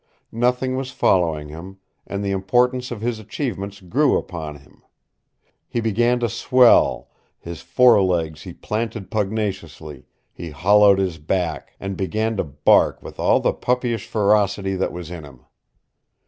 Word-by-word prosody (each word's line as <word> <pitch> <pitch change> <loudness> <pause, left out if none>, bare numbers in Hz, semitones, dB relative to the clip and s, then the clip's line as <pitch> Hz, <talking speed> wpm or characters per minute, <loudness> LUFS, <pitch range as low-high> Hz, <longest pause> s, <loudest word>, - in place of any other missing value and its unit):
Nothing 125 +2 0
was 130 0 -4
following 80 -10 +1
him, 85 +5 -10 0.3
and 100 0 -4
the 100 - -1
importance 125 +6 +1
of 120 -4 -6
his 115 -1 -2
achievements 105 -3 -5
grew 130 - +2
upon 80 -4 -6
him. 70 - -19 0.9
He 120 - -2
began 120 +2 +1
to 120 - +1
swell; 120 +2 +3 0.3
his 85 -1 -9
fore 115 +5 +4
legs 80 -5 -1
he - - -9
planted 110 -2 -5
pugnaciously, 95 - -4 0.3
he 85 - -8
hollowed 100 +6 +4
his 95 -4 -2
back, 85 +1 -3
and 95 0 -5
began 110 +4 -2
to - - 0
bark 75 -1 +2
with - - -11
all - - +3
the - - +1
puppyish 125 -3 -2
ferocity 100 -2 +1
that 95 - -1
was 90 -1 -8
in 85 -3 -7
him. 65 -4 -15
100 Hz, 145 wpm, -21 LUFS, 85-115 Hz, 0.9 s, fore